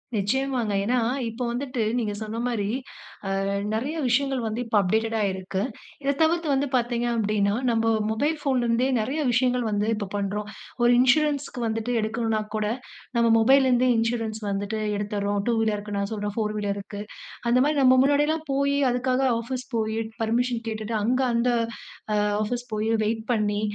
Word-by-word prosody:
நிச்சயமாங்க. 245 +1 0
ஏன்னா, 250 +4 +2 0.3
இப்போ 230 +3 -5
வந்துட்டு 255 0 -3 0.2
நீங்க 215 -3 -2
சொன்ன 220 +1 -4
மாரி 220 -5 -1 0.8
அ - - -1 0.3
நெறைய 265 +9 -2
விஷயங்கள் 270 +1 +1
வந்து 220 +2 -2
இப்ப 225 -2 -1
அப்டேட்டடா 220 +3 0
இருக்கு. 190 +1 -3 0.4
இத 275 +1 +2
தவிர்த்து 330 0 +2
வந்து 275 +1 +1
பாத்தீங்க 240 0 0
அப்படீன்னா, 205 -2 +1 0.2
நம்ப 225 -1 +1 0.2
மொபைல் 290 +9 0
ஃபோன்லருந்தே 250 -3 +1
நெறைய 265 +8 -1
விஷயங்கள் 250 0 +2
வந்து 205 0 0
இப்ப 210 -2 -4
பண்றோம். 205 +1 -2 0.3
ஒரு 240 - +5
இன்சூரன்ஸ்க்கு 280 0 +2
வந்துட்டு 225 +2 -2
எடுக்கணும்னா 220 0 -1
கூட 215 -1 0 0.5
நம்ப 235 0 +4
மொபைல்லருந்தே 255 +1 +4
இன்சூரன்ஸ் 225 -1 -1
வந்துட்டு 200 +2 -2 0.2
எடுத்தர்றோம். 205 0 -1
2 - - +3
வீலருக்கு 210 -2 -1
நான் 200 0 -2
சொல்றேன், 205 -1 -3
4 215 -2 -1
வீலருக்கு. 205 0 -4 0.5
அந்த 240 +1 +4
மாரி 300 +1 +1
நம்ப 260 0 +7
முன்னாடியல்லாம் 295 +3 +2
போயி, 280 +1 +1
அதுக்காக 255 +1 0 0.2
ஆஃபீஸ் 255 +2 -5
போயி, 220 -1 0 0.3
பெர்மிஷன் 235 +1 0
கேட்டுட்டு, 220 0 -4
அங்க 250 +5 +1
அந்த 235 +1 +2 0.7
அ - - +2 0.3
ஆஃபீஸ் 245 +3 -3
போயி, 215 +1 -1 0.2
வெயிட் 220 +1 -1
பண்ணி, 210 -2 +1
230 Hz, 150 wpm, -25 LUFS, 215-255 Hz, 0.8 s, நம்ப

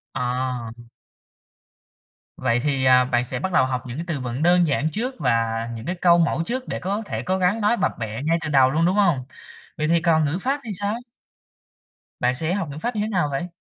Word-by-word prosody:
À. 125 -2 -2 1.7
Vậy 120 -2 +1
thì, 135 -3 0
à, 125 0 +6
bạn 125 -1 +1
sẽ 130 0 -3
bắt 190 - -3
đầu 130 -6 +4
học 125 -2 -3
những 120 +4 -6
cái 165 - -3
từ 155 -5 -2
vựng 125 +4 -3
đơn 175 -1 +4
giản 145 +2 +1
trước 250 - -3
và 115 -4 +2 0.3
những 115 0 -8 0.2
câu 175 -1 +6
mẫu 165 -1 +1
trước 255 +4 -3
để - - -3
có 200 +4 -2
thể 110 -1 -4
cố 185 +5 0
gắng 190 +4 +1
nói 220 +3 +2
bập - - +1
bẹ 110 +3 -4
ngay 165 +2 +2
từ 155 - -3
đầu 135 -2 +5
luôn, 165 +3 +2
đúng 185 +3 +2
hông? 170 -11 +2 0.5
Vậy 155 0 0
thì 170 0 +3
còn 160 -2 +3
ngữ 150 +5 -1
pháp 275 +3 0
thì 225 - -8
sao? 205 +2 0 1.3
Bạn 125 +1 +2
sẽ 160 +5 -1
học 190 -7 -2
ngữ 145 - -8
pháp 235 +8 -3
như 210 - 0
thế 215 - -1
nào 180 -8 0
vậy? 155 +6 -2
155 Hz, 225 wpm, -23 LUFS, 130-185 Hz, 1.7 s, à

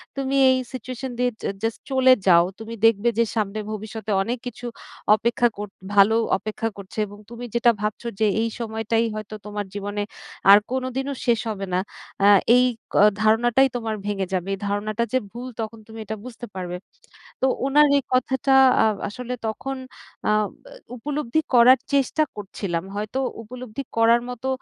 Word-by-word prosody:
"তুমি 275 0 -1
এই 260 - +4 0.2
সিচুয়েশন 255 +1 -5
দিয়ে 250 0 +2
জা - - -1
জাস্ট 225 0 -1
চলে 260 -1 +6
যাও। 170 -1 +7
তুমি 225 +1 -7
দেখবে 225 +1 +4
যে 230 - +5
সামনে 215 -1 -1
ভবিষ্যতে 215 0 -5
অনেক 240 +3 -2
কিছু 245 0 -8 0.5
অপেক্ষা 235 +2 +2
কর 205 0 -4 0.3
ভালো 205 +2 +6 0.2
অপেক্ষা 215 +2 -3
করছে 200 +1 -11
এবং 205 +1 -12
তুমি 235 +1 -8
যেটা 235 0 +5
ভাবছো 215 +3 -3
যে, 220 - +3 0.2
এই 230 - 0
সময়টাই 225 0 0
হয়তো 215 0 -6
তোমার 205 0 -4
জীবনে 205 0 -3 0.5
আর 200 - +11
কোনদিনও 260 +2 -2
শেষ 235 -2 +3
হবে 195 -2 -3
না। 180 - +2 0.5
আ - - +7 0.3
এই 250 - +6 0.3
ক - - -5 0.3
ধারণাটাই 240 +4 +4
তোমার 225 -2 -2
ভেঙে 200 -2 -1
যাবে। 185 0 -1
এই 195 - -4
ধারণাটা 215 +3 -1
যে 260 - +5
ভুল, 245 +2 -7
তখন 220 0 -6
তুমি 225 0 -10
এটা 220 - -4
বুঝতে 245 -1 -8
পারবে।" 180 -1 -4 0.6
তো - - +3 0.2
ওনার 295 +2 +5
এই 280 - 0
কথাটা 265 +1 +1 0.3
আ - - +4 0.2
আসলে 250 +4 -6
তখন 270 +5 -4 0.6
আব 210 -1 +2 0.2
এ - - -13 0.2
উপলব্ধি 295 +2 -1
করার 245 +2 +7
চেষ্টা 280 +3 +2
করছিলাম, 190 -4 -4
হয়তো 215 +5 -3 0.2
উপলব্ধি 250 +2 -7
করার 230 +1 +5
মতো 250 +1 -5
225 Hz, 165 wpm, -23 LUFS, 210-250 Hz, 0.6 s, আর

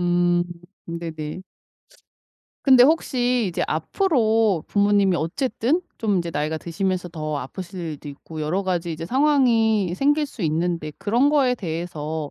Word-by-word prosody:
음 175 0 +2 0.4
네네. 165 0 -6 1.2
근데 260 -3 +7
혹시 250 -6 +2
이제 170 - -1
앞으로 220 - +1
부모님이 200 -2 +3
어쨌든 240 - 0 0.2
좀 205 -5 0
이제 170 -1 -3
나이가 155 0 -2
드시면서 180 +2 -2
더 155 -3 -4
아프실 180 +7 -7
일도 155 -3 -6
있고 155 +2 -9
여러 180 +6 0
가지 175 -3 -1
이제 165 +1 -6
상황이 230 - +3
생길 290 +6 +2
수 235 -7 -9
있는데 165 -1 -1
그런 235 +8 +2
거에 270 -4 +3
대해서 160 -5 -4
180 Hz, 290 characters per minute, -23 LUFS, 165-235 Hz, 1.2 s, 근데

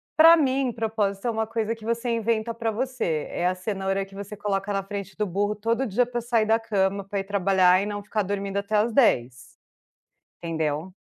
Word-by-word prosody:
Pra 325 +1 +9
mim, 270 -4 +1
propósito 220 -2 -1
é - - +2
uma 220 0 -1
coisa 225 0 -2
que 220 -1 -13
você 235 +1 -1
inventa 230 0 0
pra 230 -1 -2
você, 225 - -2
é 175 - -1
a 185 - 0
cenoura 195 0 -2
que 195 0 -16
você 200 +1 -7
coloca 195 0 -2
na 195 0 -1
frente 195 -1 -6
do 210 - 0
burro 205 +3 -1
todo 230 +5 -1
dia 235 +4 +2
pra 240 0 -4
sair 230 -2 +1
da 225 +1 +3
cama, 200 -3 0
pra 195 +1 -3
ir - - -2
trabalhar 190 -2 +3
e - - -2
não 205 0 -4
ficar 210 0 -1
dormindo 200 0 -3
até 200 +2 -1
às 220 +3 +2
10. 125 - +3 1.1
Entendeu. 160 +1 -2
205 Hz, 205 wpm, -25 LUFS, 195-230 Hz, 1.1 s, Pra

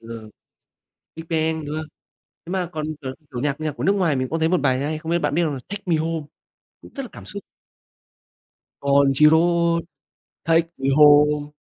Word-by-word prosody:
Ừ, 115 -1 -10 0.9
BigBang, 160 -1 -2
đúng 150 +1 -5
hông? 155 0 -4 0.6
Thế 170 - -8
mà 185 -2 -2
còn, 155 -1 -3 0.2
kiểu 130 -2 -5 0.2
kiểu, 120 - -4
nhạc 145 +1 -2
nhạc 155 -1 -1
của 145 - -7
nước 195 - +3
ngoài 175 -7 +1
mình 130 0 -1
có 165 - 0
thấy 160 0 +1
một 180 0 +1
bài 130 -3 +2
hay, 150 +3 -2
không 160 +1 -6
biết 170 - +2
bạn 150 -3 -1
biết 175 - +2
hông? 155 -3 -1
Là 135 - -5
"Take 205 0 -6
me 175 -3 +2
home", 160 -1 -2 0.6
cũng - - -15
rất 275 - -4
là 250 - -9
cảm - - -12
xúc. 200 +1 -8 1.4
Country 140 +1 +4
roads, 170 +1 +3 0.6
take 165 0 +2
me 135 0 -1
home. 150 0 +5
155 Hz, 200 wpm, -22 LUFS, 145-170 Hz, 1.4 s, home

